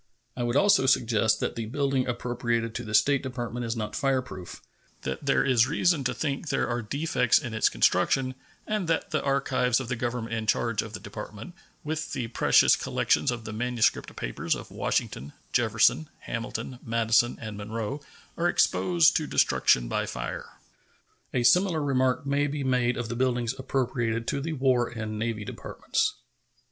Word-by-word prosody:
I 125 - -4
would 120 +1 -1
also 195 -3 +4
suggest 115 -4 +3
that - - -2
the 115 -2 -4
building 135 +1 0
appropriated 120 -2 -2
to 120 - -4
the 110 -1 -2
State 140 +5 +4
Department 120 -2 -4
is 115 - -2
not 105 -2 -4
fireproof; 130 - -2 0.4
that 65 - -5
there 135 - +3
is 125 -3 +4
reason 165 0 +2
to 130 - +1
think 145 0 -3
there - - 0
are 120 0 -1
defects 125 0 +1
in 120 -6 -4
its 110 - +3
construction, 130 -1 +2 0.3
and 210 -5 -2
that 165 -1 -1
the 155 - 0
archives 135 -3 +1
of 130 -3 -6
the 125 - 0
Government 120 -1 -3
in 110 -1 -3
charge 110 -1 +1
of 115 - -9
the - - -5
Department, 105 - -8 0.3
with 155 +1 -3
the 120 -4 -3
precious - - +5
collections - - +1
of 120 -3 -3
the 110 - -6
manuscript 120 +1 0
papers - - -2
of - - -9
Washington, 70 +4 -2 0.2
Jefferson, 80 0 +3
Hamilton, 120 +2 -5
Madison, 115 +1 +2
and 110 -2 -6
Monroe, 110 +6 -4 0.4
are 170 - +2
exposed 170 -2 +3
to 155 - -3
destruction - - +3
by - - -1
fire. - - -5 0.8
A 125 - 0
similar 180 +4 +4
remark 130 -1 +1
may 140 +1 +1
be 145 0 -3
made 125 -2 +1
of 120 -1 -3
the 120 - -4
buildings 125 -1 0
appropriated 120 -3 -1
to 140 - -1
the 160 +3 -3
War 130 -4 +2
and 110 -2 -5
Navy 110 -2 -2
Departments. 425 -1 -2
125 Hz, 170 wpm, -27 LUFS, 115-140 Hz, 0.8 s, precious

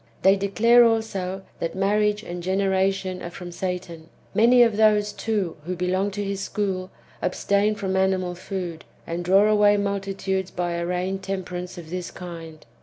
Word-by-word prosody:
They 195 +1 +6
declare 230 +5 +5
also, 195 -5 0 0.2
that 165 +1 -3
marriage 210 +2 +1
and 175 0 -6
generation 190 0 0
are 175 - -5
from 175 0 -8
Satan. 175 -2 -5 0.2
Many 240 +3 +6
of 230 -3 +2
those, 210 -1 +3
too, 205 -7 -2
who 185 - -2
belong 185 +3 0
to 205 +1 -4
his 200 -1 -3
school, 190 -2 -2 0.3
abstain 200 +3 +1
from 190 -2 -2
animal 190 -1 +1
food, 175 -2 -5 0.2
and 170 +1 -4
draw 195 +4 +5
away 210 -1 +5
multitudes 195 -1 -2
by 175 -1 -2
a 170 0 -2
feigned 185 +2 -2
temperance 185 -2 -5
of 165 -2 -9
this 180 -1 -4
kind. 165 -3 -9
190 Hz, 160 wpm, -24 LUFS, 180-205 Hz, 0.3 s, They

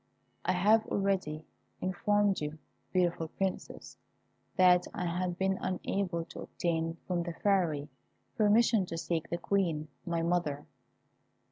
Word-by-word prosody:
I 185 - +2
have 215 +5 +4
already 190 -6 -1 0.3
informed 200 +1 +1
you, 150 +1 -4 0.3
beautiful 175 -3 +1
Princess, 190 +3 -4 0.6
that 180 -1 +5
I 180 - -2
had 175 +1 -1
been 190 0 +1
unable 185 -2 -1
to - - -9
obtain 165 -1 -2
from 180 -2 0
the 170 0 -4
Fairy 165 -7 +1 0.5
permission 215 -2 +4
to 165 - -4
seek 165 -1 -2
the 170 - -1
Queen, 170 -5 0
my 170 -2 -1
mother. 165 -4 0
180 Hz, 125 wpm, -31 LUFS, 165-195 Hz, 0.6 s, that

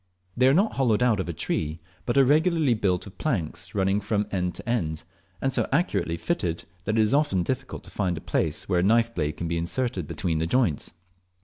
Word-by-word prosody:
They 130 +1 +4
are 135 - +5
not 200 +5 +2
hollowed 125 -4 +3
out 115 -5 +3
of 95 - -2
a - - 0
tree, 80 0 -2 0.3
but 120 - +1
are 135 - +7
regularly 155 -1 +3
built 95 -5 0
of 100 - -13
planks 105 - -2
running 95 +1 +2
from 105 0 0
ego 90 -2 0
to 90 - -9
end, 85 -10 -1 0.4
and 135 0 -1
so - - 0
accurately 135 - +1
fitted 85 - -2 0.2
that 105 +2 0
it - - +5
is 110 +2 +2
often 145 -11 +2
difficult 130 +5 -4
to - - -13
find 90 -4 -1
a - - -6
place 80 -1 -1
where 90 -3 +2
a - - +2
knife 115 +3 +3
blade 75 -5 -2
can 85 - -3
be 85 0 -1
inserted 90 - -2
between 80 +1 -1
the 80 - 0
joints. 110 - +1
105 Hz, 220 wpm, -26 LUFS, 85-130 Hz, 0.4 s, are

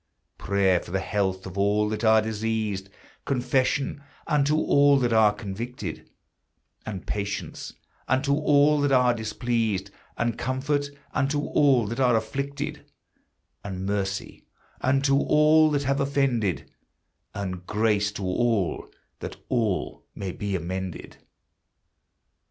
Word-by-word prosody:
Prayer 95 -2 +2
for - - -12
the 95 +2 -1
health 95 -1 -1
of 95 +1 -6
all 105 +1 +2
that 105 +1 -3
are 110 -1 +5
diseased, 110 -3 -2 0.3
Confession 130 +2 0 0.2
unto 150 -1 +2
all 145 -2 +4
that 120 -3 +1
are 110 -2 +5
convicted, 105 -1 -6 0.8
And 100 -4 -5
patience 100 -1 -4 0.3
unto 135 +2 +2
all 150 0 +4
that 145 -1 +1
are 125 -2 +4
displeased, 110 -3 -2 0.3
And 120 -1 -1
comfort 140 +3 -1 0.2
unto 145 +1 +1
all 140 -5 +3
that 115 +5 -4
are 125 -3 +4
afflicted, 140 +6 -3 0.8
And 95 -1 -5
mercy 100 -1 -3 0.4
unto 135 +1 +3
all 150 +2 +5
that 145 -2 0
have 140 +1 0
offended, 135 - 0 0.6
And 90 -3 -5
grace 105 -1 +1
to 100 - -5
all, 100 -1 0 0.3
that - - -6
all 115 -7 -1
may 95 -2 -4
be 100 +1 -3
amended. 95 +1 -5
115 Hz, 120 wpm, -25 LUFS, 100-140 Hz, 0.8 s, are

